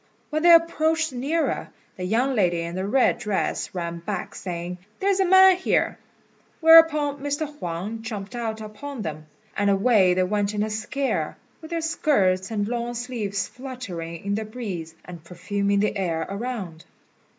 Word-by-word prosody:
When 310 Hz, +1 st, 0 dB
they 345 Hz, +1 st, +7 dB
approached 325 Hz, -2 st, +3 dB
nearer, 290 Hz, +7 st, -1 dB, 0.3 s
the 185 Hz, -, -6 dB
young 235 Hz, +8 st, +1 dB
lady 175 Hz, -7 st, +2 dB
in 170 Hz, 0 st, -5 dB
the 190 Hz, +2 st, -3 dB
red 250 Hz, +2 st, +3 dB
dress 210 Hz, -4 st, -2 dB
ran 170 Hz, -1 st, -3 dB
back, 180 Hz, +2 st, -5 dB
saying, 180 Hz, 0 st, -5 dB, 0.2 s
"There 395 Hz, +1 st, +2 dB
is 390 Hz, -, 0 dB
a 385 Hz, -, +4 dB
man 380 Hz, 0 st, +7 dB
here!" 370 Hz, -, 0 dB, 0.6 s
whereupon 320 Hz, -3 st, +6 dB
Mr. 290 Hz, +2 st, -2 dB
Huang 180 Hz, +7 st, -4 dB
jumped 215 Hz, 0 st, -6 dB
out 220 Hz, -2 st, -3 dB
upon 220 Hz, +4 st, -7 dB
them, 155 Hz, -2 st, -6 dB, 0.3 s
and 205 Hz, 0 st, +1 dB
away 195 Hz, -2 st, +4 dB
they 185 Hz, -, +2 dB
went 205 Hz, +2 st, -1 dB
in 210 Hz, -, +1 dB
a 215 Hz, -, -3 dB
scare, 260 Hz, +6 st, -2 dB, 0.2 s
with 315 Hz, -, -10 dB
their 335 Hz, -1 st, -2 dB
skirts 195 Hz, -, +1 dB
and 205 Hz, -2 st, -1 dB
long 240 Hz, +1 st, -3 dB
sleeves 225 Hz, -5 st, -3 dB
fluttering 195 Hz, -11 st, -7 dB
in 200 Hz, -, 0 dB
the 220 Hz, +2 st, -1 dB
breeze, 200 Hz, -8 st, -6 dB
and 175 Hz, -3 st, -10 dB
perfuming 200 Hz, +3 st, -1 dB
the 210 Hz, -, 0 dB
air 170 Hz, -5 st, -1 dB
around. 200 Hz, -6 st, -5 dB
215 Hz, 165 wpm, -24 LUFS, 185-275 Hz, 0.6 s, they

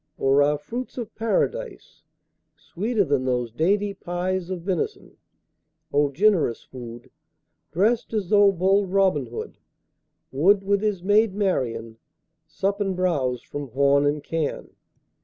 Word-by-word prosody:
Or 135 Hz, +1 st, +3 dB
are 145 Hz, +1 st, +3 dB
fruits 240 Hz, -, -7 dB
of 230 Hz, -3 st, -5 dB
Paradise 230 Hz, -, -2 dB, 0.6 s
Sweeter 210 Hz, +3 st, -1 dB
than 140 Hz, -6 st, 0 dB
those 125 Hz, -2 st, -1 dB
dainty 200 Hz, -, +1 dB
pies 180 Hz, 0 st, -3 dB
Of 180 Hz, -3 st, -5 dB
venison? 185 Hz, -2 st, -3 dB, 0.8 s
O 145 Hz, 0 st, +3 dB
generous 165 Hz, -, +2 dB
food! 120 Hz, -2 st, -10 dB, 0.6 s
Drest 220 Hz, +7 st, +1 dB
as 210 Hz, -5 st, -2 dB
though 205 Hz, -1 st, +6 dB
bold 190 Hz, +1 st, +1 dB
Robin 190 Hz, -9 st, +2 dB
Hood 115 Hz, -, -7 dB, 0.7 s
10 135 Hz, -, -5 dB
Would, 195 Hz, +3 st, +5 dB
with 200 Hz, 0 st, +1 dB
his 205 Hz, -4 st, -1 dB
maid 205 Hz, +1 st, +3 dB
Marian, 115 Hz, -, -1 dB, 0.5 s
Sup 195 Hz, +5 st, -2 dB
and 195 Hz, -2 st, -1 dB
bowse 140 Hz, -10 st, 0 dB
from 145 Hz, -1 st, -6 dB
horn 140 Hz, +3 st, +3 dB
and 145 Hz, 0 st, -1 dB
can. 160 Hz, -2 st, -3 dB
180 Hz, 135 wpm, -24 LUFS, 140-200 Hz, 0.8 s, though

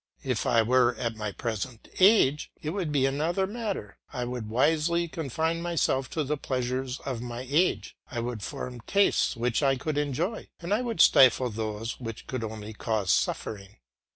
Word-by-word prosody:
If -, -, -1 dB
I 115 Hz, -, +4 dB
were 125 Hz, +1 st, +3 dB
at 115 Hz, -2 st, -3 dB
my 105 Hz, -1 st, -4 dB
present 115 Hz, +2 st, -4 dB
age, 185 Hz, -8 st, +5 dB
it 155 Hz, -, -3 dB
would 180 Hz, -4 st, -2 dB
be 140 Hz, -2 st, +3 dB
another 160 Hz, +8 st, +1 dB
matter; 205 Hz, -, -5 dB
I 125 Hz, -3 st, -3 dB
would 120 Hz, -3 st, -5 dB
wisely 160 Hz, +7 st, +2 dB
confine 160 Hz, +2 st, -2 dB
myself 160 Hz, -6 st, 0 dB
to 155 Hz, -, -1 dB
the 150 Hz, +2 st, -1 dB
pleasures 130 Hz, 0 st, -2 dB
of 130 Hz, -4 st, -4 dB
my 120 Hz, +1 st, -5 dB
age; 160 Hz, +7 st, +1 dB
I 120 Hz, -, -4 dB
would 120 Hz, -2 st, -3 dB
form 125 Hz, +5 st, -6 dB
tastes 200 Hz, -7 st, +3 dB
which 120 Hz, +2 st, 0 dB
I 135 Hz, -2 st, +3 dB
could 145 Hz, +3 st, -2 dB
enjoy, 150 Hz, -, -2 dB
and 175 Hz, +3 st, -2 dB
I 215 Hz, -, +2 dB
would 230 Hz, -9 st, 0 dB
stifle 130 Hz, -1 st, +6 dB
those 110 Hz, +1 st, -4 dB
which 115 Hz, -3 st, -7 dB
could 130 Hz, -3 st, -4 dB
only 110 Hz, 0 st, -6 dB
cause 105 Hz, -3 st, -1 dB
suffering. 100 Hz, -1 st, -1 dB
130 Hz, 175 wpm, -28 LUFS, 115-160 Hz, -, stifle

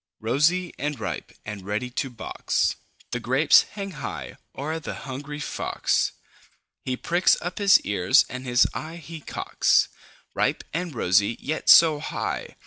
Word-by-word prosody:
Rosy 150 Hz, +10 st, +1 dB
and 145 Hz, -2 st, -3 dB
ripe, -, -, -5 dB
and 105 Hz, -1 st, -6 dB
ready 105 Hz, +6 st, -3 dB
to 135 Hz, +2 st, -2 dB
box, 120 Hz, -3 st, -1 dB, 0.4 s
The 125 Hz, -, -2 dB
grapes 130 Hz, +6 st, +5 dB
hang 200 Hz, -1 st, -5 dB
high 135 Hz, -7 st, -6 dB, 0.2 s
o'er 155 Hz, +4 st, -3 dB
the 160 Hz, -, -6 dB
hungry 140 Hz, +2 st, -6 dB
Fox. 150 Hz, -, -1 dB, 0.7 s
He 130 Hz, -1 st, -2 dB
pricks 175 Hz, +6 st, +3 dB
up 175 Hz, +5 st, -5 dB
his 200 Hz, -1 st, +6 dB
ears, 100 Hz, +6 st, +3 dB
and 130 Hz, 0 st, -7 dB
his 125 Hz, -1 st, +4 dB
eye 160 Hz, +2 st, -6 dB
he 165 Hz, 0 st, -9 dB
cocks. -, -, +1 dB, 0.4 s
Ripe -, -, 0 dB
and 165 Hz, -2 st, -3 dB
rosy, 105 Hz, +2 st, +2 dB
yet 155 Hz, +2 st, -3 dB
so 160 Hz, -3 st, +8 dB
high! -, -, -4 dB
145 Hz, 145 wpm, -25 LUFS, 125-165 Hz, 0.7 s, so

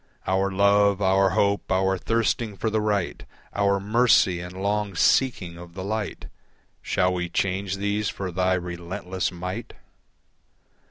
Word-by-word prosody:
Our 95 Hz, +1 st, +1 dB
love, 100 Hz, +1 st, +3 dB
our 95 Hz, 0 st, +3 dB
hope, 100 Hz, 0 st, +1 dB
our 95 Hz, +1 st, +2 dB
thirsting 115 Hz, +1 st, -1 dB
for 110 Hz, -, -1 dB
the 110 Hz, 0 st, +1 dB
right, 105 Hz, -4 st, -1 dB, 0.3 s
Our 100 Hz, -1 st, +2 dB
mercy 105 Hz, -3 st, +3 dB
and 90 Hz, +1 st, -8 dB
long 100 Hz, 0 st, -1 dB
seeking 90 Hz, -6 st, +2 dB
of 85 Hz, 0 st, -12 dB
the 95 Hz, -, -5 dB
light, 105 Hz, +1 st, -4 dB, 0.6 s
Shall 90 Hz, -1 st, +1 dB
we 90 Hz, -1 st, -2 dB
change 95 Hz, +2 st, -1 dB
these 100 Hz, +1 st, -1 dB
for 95 Hz, -2 st, -5 dB
thy 95 Hz, +1 st, +1 dB
relentless 90 Hz, +1 st, -4 dB
might? 90 Hz, +1 st, -6 dB
95 Hz, 140 wpm, -25 LUFS, 90-100 Hz, 0.6 s, love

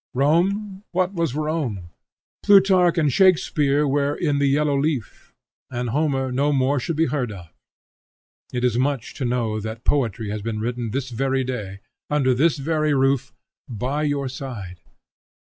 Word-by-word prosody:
Rome, 190 Hz, +8 st, +1 dB
what 185 Hz, +1 st, +1 dB
was 165 Hz, -7 st, -1 dB
Rome? 145 Hz, -, -3 dB, 0.5 s
Plutarch 190 Hz, -4 st, +5 dB
and 150 Hz, -5 st, +2 dB
Shakspeare 150 Hz, -5 st, +3 dB
were 140 Hz, +1 st, +1 dB
in 150 Hz, -5 st, 0 dB
the 140 Hz, -, +2 dB
yellow 145 Hz, +1 st, +2 dB
leaf, 140 Hz, -5 st, -2 dB, 0.4 s
and 120 Hz, -2 st, -3 dB
Homer 135 Hz, -2 st, 0 dB
no 140 Hz, +4 st, +1 dB
more 135 Hz, 0 st, +2 dB
should 165 Hz, +6 st, -3 dB
be 160 Hz, +2 st, +2 dB
heard 125 Hz, -5 st, -2 dB
of. 90 Hz, -5 st, -11 dB, 1.0 s
It 125 Hz, -1 st, -3 dB
is 125 Hz, -1 st, +2 dB
much 135 Hz, -3 st, -1 dB
to 135 Hz, -, -4 dB
know 120 Hz, -3 st, -1 dB
that 110 Hz, +2 st, -6 dB
poetry 115 Hz, -6 st, 0 dB
has 105 Hz, 0 st, -4 dB
been 110 Hz, 0 st, -3 dB
written 120 Hz, +1 st, -3 dB
this 130 Hz, +2 st, -3 dB
very 135 Hz, +2 st, 0 dB
day, 105 Hz, -7 st, -5 dB, 0.3 s
under 140 Hz, -3 st, +2 dB
this 150 Hz, +6 st, +2 dB
very 155 Hz, +1 st, 0 dB
roof, 135 Hz, -2 st, +1 dB, 0.4 s
by 125 Hz, +6 st, -2 dB
your 145 Hz, -2 st, -1 dB
side. 120 Hz, -9 st, -7 dB
135 Hz, 155 wpm, -22 LUFS, 120-150 Hz, 1.0 s, Plutarch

